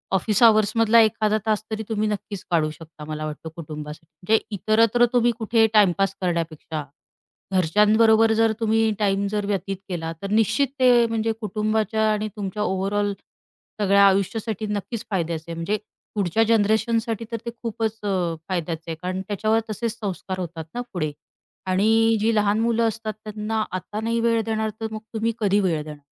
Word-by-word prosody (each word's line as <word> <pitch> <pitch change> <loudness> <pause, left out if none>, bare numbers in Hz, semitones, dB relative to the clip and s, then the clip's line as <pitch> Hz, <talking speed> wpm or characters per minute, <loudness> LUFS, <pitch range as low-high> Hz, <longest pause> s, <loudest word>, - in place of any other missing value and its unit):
Office 205 +3 +1
अवर्समधला 225 +1 +5
एखादा 215 0 +2
तास 215 -1 +1
तरी 220 0 -2
तुम्ही 215 -1 0
नक्कीच 205 -2 -5
काढू 160 -3 +2
शकता 155 -1 -12
मला 155 0 -4
वाटतं 155 +1 -6
कुटुंबासाठी, 150 -1 -8
म्हणजे 220 +4 +3 0.2
इतरत्र 225 +4 +3
तुम्ही 240 -1 +4
कुठे 225 0 +3
टाईमपास 195 -2 +3
करण्यापेक्षा. 165 -3 -2 0.7
घरच्यांबरोबर 215 +5 +4
जर 225 0 +3
तुम्ही 225 0 +2
टाईम 200 -1 +1
जर 210 -1 -1
व्यतीत 195 -1 -2
केला, 165 -3 -3
तर 200 - -4
निश्चित 225 +5 +3
ते 245 -2 +5
म्हणजे 225 0 0
कुटुंबाच्या 215 +1 0
आणि 215 0 -1
तुमच्या 205 0 -3
ओव्हरऑल 200 +2 0 0.7
सगळ्या 200 0 +5
आयुष्यासाठी 200 +2 0
नक्कीच 210 +2 -4
फायद्याचं 165 -4 -1
आहे, 170 - -5
म्हणजे 165 +6 -1 0.4
पुढच्या 205 +2 +2
जनरेशनसाठी 225 +1 +1
तर 230 - -1
ते 235 - -2
खूपच 225 -1 -2 0.5
फायद्याचं 170 -3 -2
आहे 165 - -3
कारण 185 +1 -3
त्याच्यावर 215 +2 +1
तसेच 230 +1 -3
संस्कार 190 -2 -4
होतात 170 -3 -5
ना 245 - -3
पुढे. 155 -5 -1 0.5
आणि 220 +4 +3
जी 225 +2 +2
लहान 210 0 +2
मुलं 230 0 +2
असतात 220 0 -3
त्यांना 215 +1 -2
आता 185 +4 -5
नाही 230 +1 0
वेळ 230 0 +2
देणार, 220 -1 -1
तर 220 - -1
मग 215 - -5
तुम्ही 225 +1 0
कधी 205 -2 +2
वेळ 170 -6 0
देणार? 150 -1 -9
210 Hz, 160 wpm, -23 LUFS, 185-225 Hz, 0.7 s, अवर्समधला